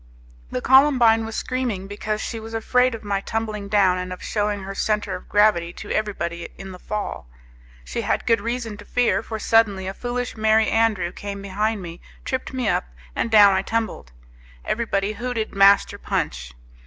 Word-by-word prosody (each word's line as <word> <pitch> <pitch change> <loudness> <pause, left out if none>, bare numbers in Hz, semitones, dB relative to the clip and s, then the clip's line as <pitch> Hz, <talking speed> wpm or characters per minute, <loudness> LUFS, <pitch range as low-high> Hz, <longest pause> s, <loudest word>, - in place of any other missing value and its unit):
The 125 - -3
Columbine 250 -4 +5
was 225 - -6
screaming 250 -7 -2
because 210 +1 -3
she 230 - -4
was 225 +1 -8
afraid 250 +2 +2
of 225 - -10
my 200 -1 -1
tumbling 215 -1 -3
down 195 -3 +3
and 180 0 -5
of 180 - -7
shewing 205 -2 -1
her 195 +1 -6
centre 210 -1 -1
of 180 - -11
gravity 205 -5 +3
to - - -8
everybody 170 -5 -2
in 195 -1 -8
the 180 - -10
fall. 210 - -5 0.6
She - - -3
had - - -1
good 230 -3 +3
reason 230 -1 -3
to 210 - -12
fear, 245 0 +1
for 225 -1 -6
suddenly 210 -4 +2
a 190 - -4
foolish 245 +2 -4
Merry 220 0 +3
Andrew 215 -6 +1
came 200 +1 -6
behind 205 +1 -1
me, 170 0 -9 0.2
tripped 260 -1 -3
me 255 -3 -2
up, 200 - +1 0.3
and - - -1
down 205 -3 +7
I 190 - +2
tumbled. 220 - -3 0.5
Everybody 210 -3 -1
hooted 240 0 -3
Master 195 0 +4
Punch. - - -3
210 Hz, 180 wpm, -23 LUFS, 195-225 Hz, 0.6 s, down